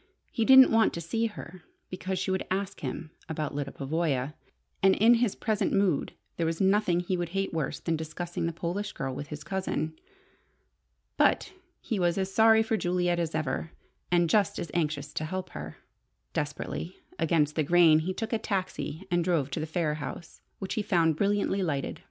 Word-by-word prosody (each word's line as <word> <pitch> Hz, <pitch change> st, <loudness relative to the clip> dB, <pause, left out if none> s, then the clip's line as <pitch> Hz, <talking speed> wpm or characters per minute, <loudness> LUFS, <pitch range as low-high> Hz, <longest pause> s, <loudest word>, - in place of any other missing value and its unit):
He 230 Hz, -, 0 dB
didn't 265 Hz, +1 st, +9 dB
want 225 Hz, 0 st, +4 dB
to -, -, -4 dB
see 225 Hz, +8 st, 0 dB
her, 185 Hz, -4 st, -10 dB, 0.3 s
because 185 Hz, +1 st, -3 dB
she 190 Hz, +1 st, -1 dB
would 190 Hz, -, -1 dB
ask 190 Hz, +1 st, -2 dB
him 155 Hz, +4 st, -5 dB, 0.2 s
about 155 Hz, -2 st, -3 dB
Lyda 140 Hz, -1 st, -3 dB
Pavoya, 145 Hz, -1 st, -1 dB, 0.5 s
and 190 Hz, 0 st, +5 dB
in 225 Hz, +3 st, +6 dB
his 235 Hz, -3 st, +2 dB
present 215 Hz, -2 st, 0 dB
mood 195 Hz, -6 st, +1 dB, 0.2 s
there 170 Hz, -, 0 dB
was 165 Hz, 0 st, -2 dB
nothing 190 Hz, -2 st, +3 dB
he 180 Hz, +1 st, -1 dB
would 175 Hz, -1 st, -2 dB
hate 195 Hz, -2 st, -1 dB
worse 160 Hz, -3 st, -2 dB
than 165 Hz, -1 st, -1 dB
discussing 165 Hz, +2 st, -4 dB
the -, -, -1 dB
Polish 180 Hz, +5 st, -3 dB
girl 135 Hz, -1 st, -3 dB
with 145 Hz, +2 st, -6 dB
his 150 Hz, 0 st, -7 dB
cousin. 185 Hz, -5 st, -2 dB, 1.2 s
But 395 Hz, -, +2 dB, 0.3 s
he 220 Hz, -5 st, -2 dB
was 175 Hz, 0 st, +2 dB
as 195 Hz, 0 st, -2 dB
sorry 220 Hz, +1 st, +6 dB
for 220 Hz, 0 st, 0 dB
Juliet 175 Hz, -2 st, 0 dB
as 165 Hz, -2 st, -2 dB
ever, 155 Hz, +2 st, -2 dB, 0.4 s
and 175 Hz, -1 st, +4 dB
just 205 Hz, +5 st, +2 dB
as 170 Hz, -, -5 dB
anxious 150 Hz, -3 st, -1 dB
to -, -, -2 dB
help 185 Hz, +3 st, -4 dB
her. 75 Hz, 0 st, -7 dB, 0.6 s
Desperately 150 Hz, +4 st, -4 dB, 0.2 s
against 155 Hz, -3 st, +2 dB
the 155 Hz, -, +2 dB
grain, 160 Hz, 0 st, +5 dB
he 170 Hz, +4 st, -2 dB
took 220 Hz, +5 st, -4 dB
a 225 Hz, -, +1 dB
taxi 190 Hz, -4 st, -3 dB
and 175 Hz, -1 st, +2 dB
drove 165 Hz, -6 st, 0 dB
to -, -, -2 dB
the 155 Hz, -, -3 dB
Phayre 155 Hz, -2 st, -1 dB
house, 155 Hz, +3 st, -8 dB, 0.2 s
which 190 Hz, -, -4 dB
he 215 Hz, -, 0 dB
found 170 Hz, -6 st, +2 dB
brilliantly 200 Hz, +2 st, +1 dB
lighted. 145 Hz, -7 st, -2 dB
175 Hz, 185 wpm, -28 LUFS, 155-195 Hz, 1.2 s, didn't